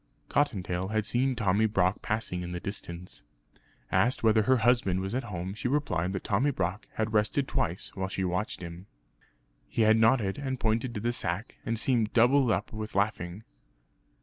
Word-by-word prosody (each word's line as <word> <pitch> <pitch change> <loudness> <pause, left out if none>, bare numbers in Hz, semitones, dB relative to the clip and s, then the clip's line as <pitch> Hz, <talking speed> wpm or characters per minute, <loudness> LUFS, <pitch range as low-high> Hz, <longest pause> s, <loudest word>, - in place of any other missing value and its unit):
Cottontail 95 -9 0
had 110 0 -1
seen 125 +3 +1
Tommy 110 0 +2
Brock 95 -2 +1
passing 110 -5 -2
in 90 0 -5
the 90 - -3
distance. 90 -2 -7 0.7
Asked 125 +1 +2
whether 110 -1 +5
her 130 +4 +3
husband 120 -7 +3
was 95 +2 -3
at 130 +2 -1
home 95 -1 -4
she 110 - -3
replied 100 - 0
that 95 - -4
Tommy 120 +8 +1
Brock 95 -1 -2
had 110 0 -1
rested 110 +6 +1
twice 85 +4 -2
while 95 -1 -3
she 95 - -2
watched 95 +7 -2
him. 85 +3 -8 0.8
He 115 - +1
had 110 +1 +5
nodded, 110 -3 +3
and 130 -2 -3
pointed 115 +2 0
to 105 - -3
the 120 +2 0
sack, 100 -1 -3
and 115 - 0
seemed 115 -2 +1
doubled 125 +2 +5
up 105 0 -1
with 110 0 -6
laughing. 100 -1 -1
110 Hz, 175 wpm, -29 LUFS, 95-120 Hz, 0.8 s, whether